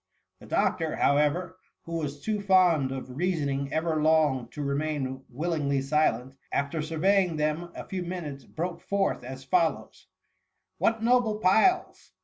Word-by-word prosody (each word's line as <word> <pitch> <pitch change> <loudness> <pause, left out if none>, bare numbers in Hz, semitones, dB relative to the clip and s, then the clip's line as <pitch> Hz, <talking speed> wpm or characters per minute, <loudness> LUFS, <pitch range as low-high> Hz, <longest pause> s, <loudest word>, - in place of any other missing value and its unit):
The - - -14
doctor, - - 0
however, 150 +6 +1 0.2
who 165 0 -4
was 145 -2 -5
too 215 -2 -1
fond 180 -8 +4
of 130 -1 -6
reasoning 145 -6 -1
ever 160 -1 0
long 150 -6 +3
to 145 +4 -6
remain 140 -2 -2
willingly 145 0 -1
silent, 135 -3 0 0.2
after 140 +3 -1
surveying 175 +3 +2
them 155 +3 -1
a - - -6
few 190 -1 -4
minutes, 170 -6 -5
broke 170 +2 -5
forth 200 -1 -1
as 130 +1 -8
follows: 165 +3 -1 0.2
— - - -49
" - - -53
What 225 0 +1
noble 235 -3 +3
piles 220 - +2
155 Hz, 145 wpm, -27 LUFS, 140-180 Hz, 0.2 s, fond